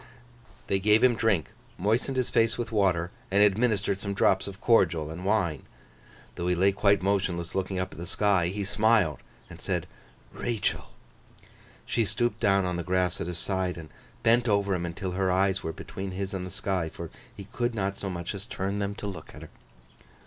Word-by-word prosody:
They 95 - +1
gave 105 +4 +4
him 130 -1 +6
drink, 110 -8 +1 0.3
moistened 115 +7 0
his 125 - 0
face 115 -1 +3
with 120 -2 -3
water, 95 -5 +2 0.2
and 100 +2 +5
administered 105 -1 +2
some 100 0 -3
drops 95 0 +3
of 100 0 -8
cordial 85 -10 +3
and 85 +3 -7
wine. 95 -8 0 0.7
Though 85 0 -3
he 90 - +2
lay 95 +3 +4
quite 100 0 +3
motionless 95 -3 0
looking 95 0 -2
up 95 +1 -2
at - - -11
the 85 - -6
sky, 95 -2 +2
he 100 +3 -3
smiled 105 -5 +2 0.3
and - - -12
said, - - -1 0.5
'Rachael.' 115 -5 -2 1.0
She 115 - +1
stooped 110 +2 0
down 100 -3 +3
on 90 -1 -1
the 85 - -3
grass 90 0 0
at - - -3
his 90 -2 -4
side, 95 -1 -1
and 80 -2 -9 0.3
bent 120 +1 +4
over 100 -1 +2
him 85 -1 -1
until 90 +2 -4
her 95 0 +1
eyes 95 +1 +2
were 80 - -3
between 95 +3 -6
his 95 +1 -4
and 90 -1 -3
the - - -7
sky, 95 -3 -2
for 85 0 -8 0.3
he 100 - -7
could 120 +3 -2
not 100 -2 -1
so 100 - -5
much 85 0 -4
as 100 +2 -7
turn 100 -2 -2
them 100 0 -2
to 105 - -7
look 100 -2 -7
at - - -10
her. - - -11
95 Hz, 200 wpm, -28 LUFS, 90-105 Hz, 1.0 s, him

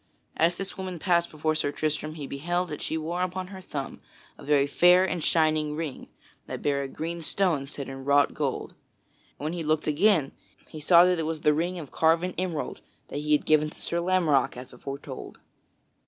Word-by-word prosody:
As 170 +2 +3
this 195 +1 -6
woman 185 -2 -4
passed 170 0 +2
before 155 +1 -1
Sir 155 -2 -1
Tristram, 155 +1 -2
he 150 -3 -6
beheld 175 +6 -2
that 150 - -6
she 160 - -2
wore 170 +3 -3
upon 185 +1 -2
her 190 -1 -9
thumb 140 -6 -6 0.3
a - - -14
very 145 -1 +3
fair 180 +5 +5
and 180 -4 -2
shining 155 -2 +2
ring, 155 -4 -5 0.4
that - - -6
bare 140 -1 +1
a 140 - -3
green 165 +5 -5
stone 160 -4 0
set 140 -1 -7
in 135 0 -7
wrought 140 +1 +3
gold. - - -2 0.7
And - - -10
when 155 - -1
he 170 -2 -3
looked 155 0 +1
again 155 -1 +3 0.4
he 155 - -8
saw 170 +3 +7
it 180 -2 +2
was 160 -1 -3
that 150 - +4
ring 175 +4 -1
of 155 -6 -8
carven 165 +3 +2
emerald 175 -5 -3 0.3
that - - -4
he 150 0 +1
had 150 - +2
given 155 0 +3
to - - -15
Sir 170 - -1
Lamorack 160 -8 +2
as 125 +1 -9
aforetold. 135 +1 -8
155 Hz, 200 wpm, -27 LUFS, 145-175 Hz, 0.7 s, saw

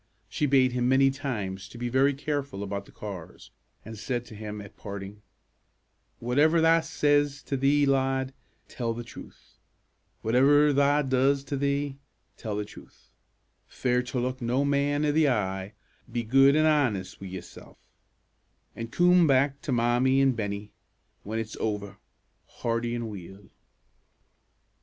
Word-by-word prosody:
She 150 - -1
bade 130 -2 +4
him 125 0 0
many 135 +1 +4
times 105 -9 -4
to 120 - -12
be 120 +1 -3
very 135 +3 +2
careful 140 -7 -3
about 100 0 -4
the - - -16
cars, 95 -6 -9 0.3
and 110 +1 -8
said 120 +1 -3
to 110 - -12
him, 105 0 -6
at 100 -1 -11
parting, 100 0 -8 1.0
"Whatever 145 +8 +3
tha 165 +1 +5
says 145 -1 +1
to 140 - -3
thee, 140 +2 +3
lad, 135 -1 +1 0.3
tell 115 -2 -3
the 120 - -5
truth; 120 - -14 0.6
whatever 145 +6 +4
tha 145 +1 +3
does 135 +2 +2
to 140 +1 -4
thee, 140 0 -1 0.4
tell 110 -3 -5
the 105 0 -2
truth; 105 - -16 0.6
fear 125 -1 0
to 125 +1 -4
look 130 +1 -3
no 125 +4 +1
man 145 +1 +1
i' 150 - +2
the 155 -1 +3
eye; 95 -4 -2 0.4
be 120 0 -2
good 135 +5 +5
an' 155 0 +4
honest 120 -14 +1
wi' 95 - -6
yoursel', 90 -1 -10 1.0
an' 115 - -5
coom 175 +5 +4
back 140 0 +2
to - - -4
Mommie 125 +2 +2
an' 135 -1 +4
Bennie, 105 -3 -4 0.5
when 110 +2 -5
it's 115 -1 -4
ower, 105 -2 -3 0.5
hearty 115 0 -2
an' 120 -1 -3
weel." 95 -1 -10
130 Hz, 150 wpm, -27 LUFS, 105-140 Hz, 1.0 s, tha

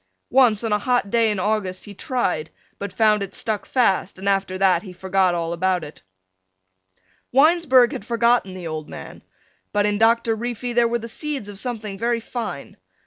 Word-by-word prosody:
Once 240 -4 +4
on 225 -2 0
a 210 - +2
hot 245 -2 0
day 230 -1 +3
in 210 -2 -1
August 195 -2 -1
he 205 - -10
tried 185 - -2 0.3
but 200 - -5
found 215 -2 +3
it 200 -1 -5
stuck 215 -2 -3
fast 200 -8 +1
and 190 +1 -6
after 195 -1 0
that 185 -3 +3
he 195 - -10
forgot 190 0 +1
all 170 0 -2
about 180 0 0
it. 150 - -11 1.3
Winesburg 270 -3 +5
had - - -6
forgotten 235 -4 +1
the 180 -2 -8
old 155 -1 -5
man, - - -10 0.5
but 205 0 +1
in 205 0 0
Doctor 230 0 +3
Reefy 240 +1 -4
there 240 0 +4
were 235 +1 0
the 230 0 -7
seeds 280 -2 -3
of 205 -1 -8
something 215 -5 -5
very 235 +1 0
fine. 230 +1 -6
210 Hz, 185 wpm, -22 LUFS, 190-235 Hz, 1.3 s, Winesburg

